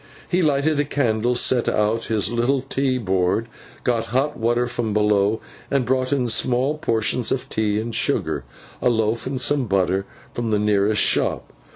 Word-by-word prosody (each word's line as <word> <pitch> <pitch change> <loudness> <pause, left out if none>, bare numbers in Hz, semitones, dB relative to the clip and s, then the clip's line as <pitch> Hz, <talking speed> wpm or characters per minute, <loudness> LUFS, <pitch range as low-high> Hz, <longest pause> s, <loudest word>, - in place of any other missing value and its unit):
He 180 +1 +1
lighted 150 -1 +1
a - - +3
candle, 120 -4 0
set 120 0 +2
out 110 +2 0
his 110 +1 0
little 120 +4 +1
tea 135 -1 -1
board, 95 0 0 0.4
got 115 -2 0
hot 135 +6 0
water 120 +2 +1
from 120 -3 -3
below, 105 0 +2 0.3
and 135 -3 +1
brought 130 +1 0
in 130 -3 +1
small 125 +5 +1
portions 115 -2 0
of 130 - -1
tea 105 -1 0
and 115 +1 -4
sugar, 80 - 0 0.4
a - - +3
loaf, 110 +1 0
and 130 -1 -3
some 135 -1 +1
butter 95 0 0 0.3
from 120 -1 -3
the 105 - +2
nearest 105 0 +2
shop. - - 0
115 Hz, 170 wpm, -22 LUFS, 105-130 Hz, 0.4 s, a